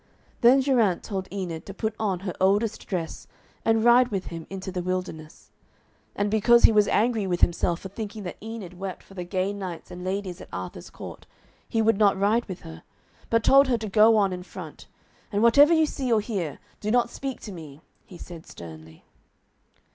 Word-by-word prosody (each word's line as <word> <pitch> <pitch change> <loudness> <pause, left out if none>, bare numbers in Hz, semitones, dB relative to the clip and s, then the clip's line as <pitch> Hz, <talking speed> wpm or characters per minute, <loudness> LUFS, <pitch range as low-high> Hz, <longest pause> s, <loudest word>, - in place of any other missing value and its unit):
Then 255 +3 +6
Geraint 235 -9 +2
told 190 -3 -4
Enid 180 -5 -4
to 195 - -8
put 220 0 -2
on 195 -5 -1
her 190 -3 -4
oldest 205 +3 +1
dress 170 -4 -4 0.4
and 225 -1 +2
ride 240 +1 +6
with 195 -5 -3
him 165 -1 -7
into 190 0 -6
the 180 -1 -3
wilderness. 180 -4 -5 0.6
And 205 0 0
because 235 +2 +5
he - - +9
was 210 -1 +4
angry 220 -3 +1
with 175 -1 -1
himself 175 0 +2
for 195 - -7
thinking 210 +1 -6
that 175 - -7
Enid 210 -5 -8
wept 195 -1 -6
for - - -17
the 180 -2 -5
gay 185 +2 -1
knights 185 -4 -7
and 180 0 -8
ladies 190 -1 -3
at - - -11
Arthur's 90 -1 -7
court, - - -10 0.4
he 225 -1 +1
would 220 -2 +3
not 200 -2 +4
ride 215 +5 +2
with 185 -3 -7
her, 80 0 -10 0.5
but 230 -1 +2
told 275 +1 +6
her 245 -2 +2
to 220 -1 -5
go 220 +2 +6
on 195 -3 +2
in 180 - -5
front, 180 - -10 0.4
and 205 +1 +1
'whatever 285 +7 +7
you 320 -1 +5
see 265 -4 -3
or 225 - +4
hear, 195 - -3 0.2
do 210 - -3
not 240 +1 +2
speak 270 -2 -5
to 210 - -8
me,' 155 -5 -10 0.2
he 185 - -13
said 170 -2 -11
sternly. 80 -1 -12
200 Hz, 200 wpm, -25 LUFS, 180-225 Hz, 0.6 s, he